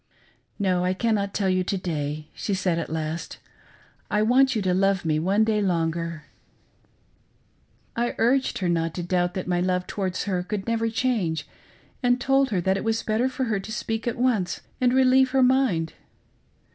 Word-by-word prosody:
"No: 185 Hz, -3 st, +1 dB
I 185 Hz, +1 st, 0 dB
cannot 205 Hz, -2 st, 0 dB
tell 200 Hz, -1 st, -1 dB
you 185 Hz, 0 st, +2 dB
to 195 Hz, +2 st, -2 dB
day," 155 Hz, -4 st, -3 dB
she 200 Hz, -, -2 dB
said 180 Hz, -3 st, 0 dB
at 165 Hz, -, -4 dB
last, 160 Hz, +1 st, -4 dB, 0.4 s
" -, -, -27 dB, 0.3 s
I 210 Hz, 0 st, +2 dB
want 260 Hz, +3 st, +4 dB
you 215 Hz, -, 0 dB
to 185 Hz, -1 st, +1 dB
love 195 Hz, 0 st, +1 dB
me 155 Hz, -1 st, +1 dB
one 195 Hz, +6 st, +2 dB
day 215 Hz, -1 st, +1 dB
longer." 165 Hz, -3 st, -1 dB, 1.7 s
I 240 Hz, +1 st, -1 dB
urged 260 Hz, +3 st, +2 dB
her 185 Hz, -, -1 dB
not 165 Hz, -1 st, 0 dB
to 175 Hz, -, -3 dB
doubt 175 Hz, 0 st, 0 dB
that 185 Hz, -, -3 dB
my 175 Hz, -1 st, +1 dB
love 180 Hz, 0 st, 0 dB
towards 190 Hz, -2 st, -3 dB
her 185 Hz, -3 st, -1 dB
could 195 Hz, +2 st, -4 dB
never 230 Hz, 0 st, 0 dB
change, 200 Hz, -, -1 dB, 0.5 s
and 245 Hz, -1 st, +2 dB
told 270 Hz, +1 st, +2 dB
her 190 Hz, -5 st, 0 dB
that 190 Hz, +2 st, +1 dB
it -, -, -4 dB
was 225 Hz, 0 st, 0 dB
better 225 Hz, +4 st, +1 dB
for 260 Hz, +1 st, -3 dB
her 220 Hz, -5 st, 0 dB
to 205 Hz, +3 st, -8 dB
speak 225 Hz, +1 st, -3 dB
at 235 Hz, -, -1 dB
once 230 Hz, -8 st, 0 dB, 0.2 s
and 250 Hz, -1 st, +4 dB
relieve 260 Hz, 0 st, +4 dB
her 260 Hz, -, +5 dB
mind. 250 Hz, -11 st, +2 dB
195 Hz, 185 wpm, -25 LUFS, 175-230 Hz, 1.7 s, her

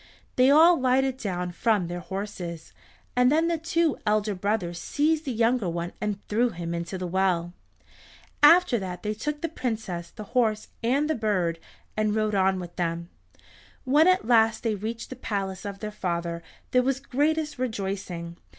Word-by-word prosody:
They 255 Hz, +1 st, +5 dB
all 325 Hz, +3 st, +7 dB
lighted 260 Hz, 0 st, +2 dB
down 180 Hz, -6 st, -3 dB
from 210 Hz, +1 st, +1 dB
their 175 Hz, +1 st, -4 dB
horses, 180 Hz, -3 st, -6 dB, 0.4 s
and 250 Hz, +1 st, +4 dB
then 320 Hz, +2 st, +3 dB
the 335 Hz, -1 st, 0 dB
two 330 Hz, -2 st, +1 dB
elder 210 Hz, 0 st, +1 dB
brothers 180 Hz, -3 st, -2 dB
seized 310 Hz, -, 0 dB
the 270 Hz, -, -2 dB
younger 230 Hz, -3 st, +1 dB
one 170 Hz, +1 st, -4 dB
and 210 Hz, -2 st, -3 dB
threw 235 Hz, +4 st, +2 dB
him 170 Hz, -4 st, -5 dB
into 170 Hz, +2 st, -4 dB
the 180 Hz, -, -4 dB
well. 175 Hz, -1 st, 0 dB, 0.9 s
After 315 Hz, -4 st, +6 dB
that 185 Hz, -2 st, -6 dB
they 210 Hz, 0 st, -1 dB
took 295 Hz, +8 st, -4 dB
the 335 Hz, -, 0 dB
Princess, 215 Hz, -, -4 dB
the 215 Hz, -, -9 dB
horse, 220 Hz, -4 st, +1 dB
and 270 Hz, +6 st, +1 dB
the 315 Hz, -, +1 dB
bird, 185 Hz, -, 0 dB, 0.4 s
and 215 Hz, 0 st, +1 dB
rode 215 Hz, -1 st, 0 dB
on 190 Hz, -1 st, +2 dB
with 175 Hz, -1 st, -9 dB
them. 170 Hz, -1 st, -2 dB, 0.7 s
When 295 Hz, +5 st, +4 dB
at 370 Hz, 0 st, +3 dB
last 225 Hz, -2 st, +3 dB
they 225 Hz, -2 st, +1 dB
reached 225 Hz, +4 st, -5 dB
the -, -, -5 dB
palace 195 Hz, -5 st, -4 dB
of 200 Hz, -1 st, -6 dB
their 215 Hz, -1 st, -4 dB
father 170 Hz, -4 st, -3 dB, 0.3 s
there 250 Hz, -, +4 dB
was 265 Hz, +1 st, 0 dB
the 275 Hz, -, -24 dB
greatest 305 Hz, +1 st, 0 dB
rejoicing. 190 Hz, -7 st, -4 dB
215 Hz, 175 wpm, -26 LUFS, 180-255 Hz, 0.9 s, all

